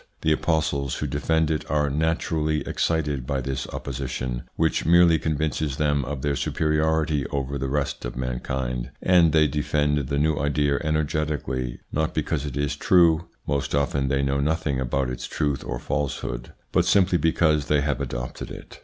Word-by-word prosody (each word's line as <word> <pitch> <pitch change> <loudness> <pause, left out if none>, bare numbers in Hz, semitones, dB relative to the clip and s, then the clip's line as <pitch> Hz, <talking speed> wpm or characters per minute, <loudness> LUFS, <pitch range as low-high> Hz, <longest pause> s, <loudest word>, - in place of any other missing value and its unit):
The 80 - +2
apostles 75 -4 0
who - - -3
defend 80 +3 +1
it 75 - -1
are 75 0 +2
naturally 80 0 0
excited 75 -6 -1
by 70 -2 0
this 65 +1 -3
opposition, 65 -2 -4
which 80 0 +1
merely 85 0 +5
convinces 75 -2 -1
them 75 -2 +1
of 70 0 -5
their 70 -1 +1
superiority 75 -1 +1
over 70 0 -3
the 65 +1 -2
rest 70 0 -2
of - - -5
mankind, 65 -1 -3
and 85 -3 +5
they 80 0 +5
defend 75 0 +1
the 70 0 -1
new 75 +1 +2
idea 70 0 +1
energetically, 75 -5 -1
not 80 +1 -1
because 75 -1 -1
it 70 -1 -5
is 70 0 0
true 85 0 +4 0.2
most 70 0 -1
often 70 -1 +1
they 70 0 +1
know 70 0 +1
nothing 75 -2 0
about 65 +1 0
its 65 0 -5
truth 70 -3 -1
or - - -4
falsehood 65 -3 -3 0.2
but - - +3
simply 95 -3 +4
because 80 -3 +2
they 75 -1 +3
have 70 0 -1
adopted - - -5
it. - - -10
75 Hz, 165 wpm, -24 LUFS, 70-80 Hz, 0.2 s, merely